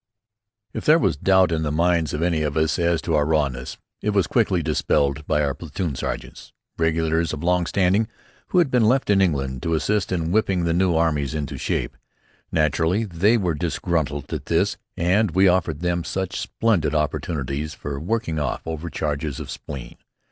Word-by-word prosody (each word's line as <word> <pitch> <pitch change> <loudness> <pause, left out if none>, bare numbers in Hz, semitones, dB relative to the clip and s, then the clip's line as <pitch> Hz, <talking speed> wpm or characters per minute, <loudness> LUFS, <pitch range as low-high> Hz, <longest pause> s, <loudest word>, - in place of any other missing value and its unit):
If - - -4
there 155 +2 +6
was 95 - +1
doubt 95 +4 +3
in 80 -1 0
the 75 -2 -1
minds 85 -1 +2
of 75 +2 -2
any 85 -3 +1
of 75 0 -1
us 80 -1 +1
as 85 -1 +1
to 85 - -1
our 75 -1 +3
rawness, 75 -4 -1 0.2
it 105 - -1
was 100 -4 +2
quickly 95 -5 +1
dispelled 70 +1 0
by 75 -1 +2
our 70 -1 0
platoon 80 +1 -4
sergeants, - - -6 0.2
regulars 80 0 +1
of 75 +1 -5
long 90 0 +2
standing, 100 +3 +2 0.4
who - - -1
had 165 -7 +4
been 125 -3 +3
left 125 0 +2
in 100 -1 +4
England 70 -8 0
to 85 0 0
assist 100 +6 0
in 85 -2 -1
whipping 95 -3 +1
the 85 -1 +1
new 90 0 +2
armies 80 -3 +1
into 75 -2 -3
shape. - - -2 0.6
Naturally, 80 +6 +1
they 100 +4 +2
were 90 -6 0
disgruntled 75 -1 -2
at - - -5
this, - - +1 0.2
and 90 +2 +2
we 95 +1 +5
offered 85 -4 +1
them 85 -1 0
such 95 +3 -3
splendid 85 -10 0
opportunities 75 -1 -2
for 70 -2 -5
working 85 -2 -2
off 75 - -3
overcharges 75 -3 -3
of - - -6
spleen. 65 -5 -8
80 Hz, 180 wpm, -23 LUFS, 75-95 Hz, 0.6 s, there